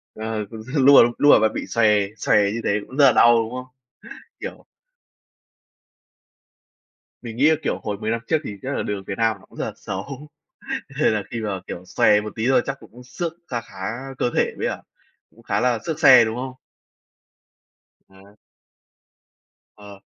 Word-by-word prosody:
Ờ, 110 Hz, -1 st, -4 dB
cũng 110 Hz, -1 st, -9 dB
xin 130 Hz, +6 st, -8 dB
lùa 140 Hz, -2 st, +9 dB
lùa 145 Hz, -, +6 dB
và 110 Hz, 0 st, +3 dB
bị -, -, -5 dB
xòe 115 Hz, -2 st, +2 dB, 0.3 s
xòe 105 Hz, -1 st, +2 dB
như 115 Hz, -, -3 dB
thế 100 Hz, -, +1 dB
cũng 130 Hz, -, -11 dB
rất 145 Hz, -, +6 dB
là 135 Hz, -, +7 dB
đau, 120 Hz, 0 st, +5 dB
đúng 115 Hz, 0 st, -1 dB
không? 125 Hz, 0 st, -6 dB, 0.8 s
Kiểu -, -, -8 dB, 2.6 s
Mình 115 Hz, -2 st, -8 dB
nghĩ 145 Hz, +5 st, +5 dB
là, 160 Hz, -, +4 dB
kiểu, -, -, -2 dB
hồi 105 Hz, -1 st, -3 dB
10 110 Hz, +2 st, -3 dB
năm 115 Hz, -, -1 dB
trước 160 Hz, -, +2 dB
thì 105 Hz, -, -6 dB
chắc 135 Hz, +1 st, -4 dB
là -, -, -2 dB
đường 100 Hz, -1 st, -4 dB
Việt 95 Hz, -, -5 dB
Nam 115 Hz, -2 st, +1 dB
nó -, -, -20 dB
cũng -, -, -19 dB
rất -, -, -1 dB
là -, -, -5 dB
xấu, 135 Hz, +10 st, -7 dB, 0.7 s
nên 115 Hz, -, +3 dB
là 105 Hz, -1 st, -2 dB
khi 115 Hz, -2 st, -4 dB
mà, 100 Hz, -4 st, -3 dB
kiểu, 90 Hz, -, -7 dB
xòe 105 Hz, +3 st, +3 dB
một 105 Hz, 0 st, -7 dB
tí 115 Hz, +2 st, -1 dB
thôi 135 Hz, -, +4 dB
chắc 135 Hz, 0 st, -4 dB
cũng 115 Hz, +2 st, -15 dB
xước 165 Hz, +6 st, -5 dB
kha 120 Hz, -2 st, -3 dB
khá 110 Hz, -, -18 dB, 0.4 s
cơ -, -, 0 dB
thể -, -, +2 dB
đấy -, -, -1 dB
ạ, -, -, -6 dB, 0.5 s
cũng -, -, -22 dB
khá -, -, -1 dB
là 125 Hz, -2 st, +1 dB
xước 160 Hz, -2 st, -3 dB
xe, 130 Hz, -6 st, +8 dB
đúng 110 Hz, 0 st, -3 dB
không? 130 Hz, +1 st, -5 dB, 1.5 s
Ờ. 95 Hz, +2 st, -20 dB, 1.4 s
Ờ, 100 Hz, -1 st, -13 dB
115 Hz, 190 wpm, -22 LUFS, 105-130 Hz, 2.6 s, lùa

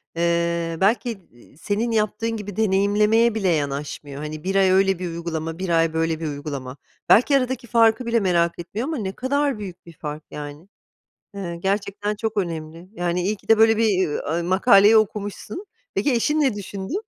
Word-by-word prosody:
eee, 170 Hz, 0 st, 0 dB
belki 225 Hz, +1 st, +1 dB
d 170 Hz, -10 st, -26 dB
eee, 130 Hz, +4 st, -20 dB
senin 215 Hz, +6 st, -1 dB
yaptığın 215 Hz, +1 st, 0 dB
gibi 205 Hz, -2 st, -7 dB
deneyimlemeye 210 Hz, +2 st, +3 dB
bile 195 Hz, -4 st, 0 dB
yanaşmıyor, 145 Hz, -1 st, -3 dB
hani, 155 Hz, 0 st, -6 dB
1 195 Hz, +1 st, -2 dB
ay 190 Hz, -1 st, +4 dB
öyle 190 Hz, -1 st, +3 dB
bir 180 Hz, -, -3 dB
uygulama, 165 Hz, -1 st, -4 dB
1 185 Hz, -1 st, -3 dB
ay 165 Hz, -1 st, +2 dB
böyle 160 Hz, 0 st, 0 dB
bir 160 Hz, -, -3 dB
uygulama. 140 Hz, -2 st, -6 dB, 0.3 s
Belki 275 Hz, +5 st, +6 dB
aradaki 255 Hz, -2 st, -2 dB
farkı 230 Hz, +1 st, +3 dB
bile 235 Hz, 0 st, +2 dB
merak 170 Hz, -3 st, +1 dB
etmiyor 205 Hz, +9 st, -4 dB
ama 315 Hz, -2 st, -2 dB
ne 195 Hz, -4 st, -3 dB
kadar 275 Hz, +2 st, -1 dB
büyük 185 Hz, -5 st, -8 dB
bir 170 Hz, -, -13 dB
fark 150 Hz, 0 st, -7 dB
yani. 150 Hz, +3 st, -8 dB, 0.7 s
Eee, 175 Hz, -4 st, -5 dB
gerçekten 200 Hz, +3 st, -2 dB
çok 220 Hz, 0 st, -4 dB
önemli, 165 Hz, -1 st, -4 dB
yani, 175 Hz, -2 st, -1 dB
iyi 205 Hz, +4 st, 0 dB
ki -, -, -23 dB
de 225 Hz, -, +5 dB
böyle 225 Hz, 0 st, +5 dB
bir, 225 Hz, -, +3 dB, 0.5 s
eee, 170 Hz, -, 0 dB
makaleyi 200 Hz, +4 st, +5 dB
okumuşsun. 210 Hz, -, -2 dB, 0.3 s
Peki 290 Hz, -, +1 dB
eşin 295 Hz, +6 st, +1 dB
ne 270 Hz, -5 st, +2 dB
düşündü? 195 Hz, -, -6 dB
195 Hz, 180 wpm, -22 LUFS, 165-220 Hz, 0.7 s, Belki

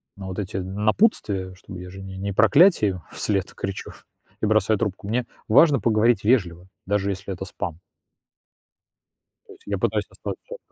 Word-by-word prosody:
Но 95 Hz, -1 st, -8 dB
вот 95 Hz, +1 st, -5 dB
эти 95 Hz, -1 st, -4 dB
напутствия, 100 Hz, -, 0 dB
чтобы 90 Hz, 0 st, -10 dB
я 90 Hz, -, -8 dB
же 95 Hz, +1 st, -10 dB
не 95 Hz, 0 st, -8 dB
не 100 Hz, +1 st, -3 dB
проклятие 125 Hz, -, +5 dB
им 90 Hz, -2 st, -7 dB
вслед 100 Hz, -3 st, -1 dB
кричу 95 Hz, 0 st, -5 dB, 0.5 s
и -, -, +2 dB
бросаю 110 Hz, 0 st, +3 dB
трубку, 100 Hz, -2 st, -3 dB
мне 120 Hz, +3 st, 0 dB, 0.2 s
важно 140 Hz, +5 st, +6 dB
поговорить 115 Hz, -1 st, +3 dB
вежливо, 90 Hz, -7 st, +1 dB, 0.2 s
даже 100 Hz, 0 st, 0 dB
если 95 Hz, 0 st, -4 dB
это 95 Hz, +1 st, -6 dB
спам. 85 Hz, -3 st, -5 dB, 1.7 s
То 415 Hz, -, -11 dB
есть 395 Hz, -, -22 dB
я -, -, -2 dB
пытаюсь -, -, 0 dB
оставаться -, -, -7 dB
100 Hz, 160 wpm, -24 LUFS, 95-110 Hz, 1.7 s, важно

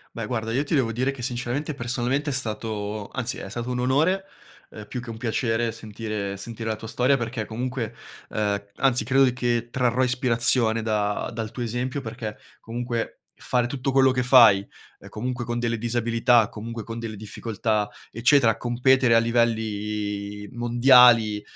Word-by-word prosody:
Beh, 115 Hz, -2 st, -4 dB
guarda, 110 Hz, -1 st, -3 dB
io 130 Hz, +5 st, 0 dB
ti 155 Hz, -, -2 dB
devo 130 Hz, -5 st, +2 dB
dire 130 Hz, +4 st, 0 dB
che, 125 Hz, -3 st, -9 dB
sinceramente, 125 Hz, +5 st, -3 dB
personalmente, 135 Hz, +3 st, -2 dB
è -, -, -2 dB
stato 110 Hz, -4 st, -3 dB
anzi, 125 Hz, -1 st, -4 dB
è -, -, -7 dB
stato 120 Hz, +4 st, -5 dB
un 125 Hz, -, -2 dB
onore, 155 Hz, +10 st, +2 dB, 0.5 s
ehm, 105 Hz, -1 st, -10 dB
più 125 Hz, -, -4 dB
che 120 Hz, -, -11 dB
un 115 Hz, -, -6 dB
piacere 115 Hz, -1 st, 0 dB
sentire 105 Hz, -2 st, -5 dB
sentire 115 Hz, +3 st, -6 dB
la 110 Hz, -, 0 dB
tua 110 Hz, +1 st, -9 dB
storia 125 Hz, +5 st, +2 dB
perché 115 Hz, -2 st, -3 dB
comunque 120 Hz, +1 st, -4 dB, 0.4 s
ehm, 105 Hz, -1 st, -1 dB, 0.2 s
anzi, 130 Hz, -4 st, +2 dB
credo 135 Hz, +1 st, +4 dB
che 120 Hz, -1 st, -1 dB
trarrò 125 Hz, 0 st, +1 dB
ispirazione 120 Hz, -2 st, +2 dB
da 105 Hz, -2 st, -1 dB
dal 115 Hz, -1 st, -5 dB
tuo 125 Hz, -, -5 dB
esempio 125 Hz, +4 st, -2 dB
perché 110 Hz, -3 st, -6 dB, 0.2 s
comunque 120 Hz, 0 st, -4 dB, 0.3 s
fare 125 Hz, -1 st, +1 dB
tutto 135 Hz, +1 st, -2 dB
quello 135 Hz, 0 st, +5 dB
che 125 Hz, 0 st, 0 dB
fai, 115 Hz, -6 st, +6 dB, 0.3 s
ehm, -, -, -13 dB
comunque 125 Hz, +2 st, -4 dB
con 120 Hz, 0 st, -2 dB
delle 115 Hz, -1 st, -1 dB
disabilità, 115 Hz, 0 st, +2 dB
comunque 115 Hz, +1 st, -6 dB
con 115 Hz, +1 st, -7 dB
delle 115 Hz, -2 st, -5 dB
difficoltà, 105 Hz, 0 st, -2 dB, 0.2 s
eccetera, 120 Hz, 0 st, +3 dB
competere 125 Hz, 0 st, +3 dB
a -, -, +7 dB
livelli 105 Hz, -3 st, -1 dB
mondiali, 120 Hz, -3 st, +5 dB
120 Hz, 165 wpm, -24 LUFS, 110-125 Hz, 0.5 s, a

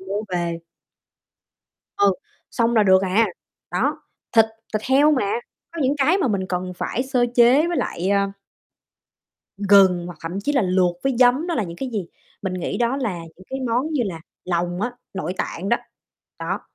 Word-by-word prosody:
mua 200 Hz, +2 st, -2 dB
về. 170 Hz, -2 st, -2 dB, 1.4 s
Ừ, 200 Hz, -1 st, +4 dB, 0.4 s
xong 235 Hz, 0 st, +1 dB
là 215 Hz, -, +6 dB
được 190 Hz, -1 st, +5 dB
à, 200 Hz, +4 st, +3 dB, 0.4 s
đó. -, -, 0 dB, 0.3 s
Thịt 225 Hz, -1 st, +7 dB, 0.3 s
thịt 215 Hz, 0 st, -1 dB
heo 280 Hz, +4 st, +4 dB
mà, 205 Hz, -8 st, +1 dB, 0.4 s
có 335 Hz, -, -5 dB
những 265 Hz, +2 st, +2 dB
cái 310 Hz, +8 st, +3 dB
mà 340 Hz, -, +1 dB
mình 195 Hz, -3 st, -1 dB
cần 180 Hz, 0 st, -2 dB
phải 250 Hz, -, -2 dB
sơ 260 Hz, -2 st, +1 dB
chế 250 Hz, +6 st, +6 dB
với 345 Hz, 0 st, -1 dB
lại, 180 Hz, +3 st, -2 dB
à 200 Hz, 0 st, +2 dB, 1.3 s
gừng 195 Hz, -3 st, +5 dB
hoặc 175 Hz, -3 st, -9 dB
thậm 175 Hz, +4 st, -4 dB
chí 290 Hz, +8 st, -1 dB
là 270 Hz, -5 st, +3 dB
luộc 180 Hz, -1 st, +2 dB
với 270 Hz, -2 st, 0 dB
giấm, 255 Hz, +6 st, +4 dB
đó 340 Hz, -, -1 dB
là 220 Hz, -, 0 dB
những 170 Hz, -1 st, -8 dB
cái 265 Hz, -, -4 dB
gì? 200 Hz, -6 st, -2 dB, 0.4 s
Mình 190 Hz, -2 st, -2 dB
nghĩ 180 Hz, -, -3 dB
đó 245 Hz, +3 st, +1 dB
là 215 Hz, -10 st, -2 dB, 0.2 s
những 185 Hz, -, -16 dB
cái 265 Hz, 0 st, -3 dB
món 255 Hz, +7 st, 0 dB
như 270 Hz, -5 st, +1 dB
là 175 Hz, -6 st, -4 dB, 0.2 s
lòng 175 Hz, 0 st, -1 dB
á, 240 Hz, +3 st, -1 dB, 0.2 s
nội 185 Hz, -1 st, -3 dB
tạng 190 Hz, +4 st, -3 dB
đó, 235 Hz, -, +4 dB, 0.6 s
đó, -, -, -3 dB
205 Hz, 185 wpm, -22 LUFS, 185-255 Hz, 1.4 s, Thịt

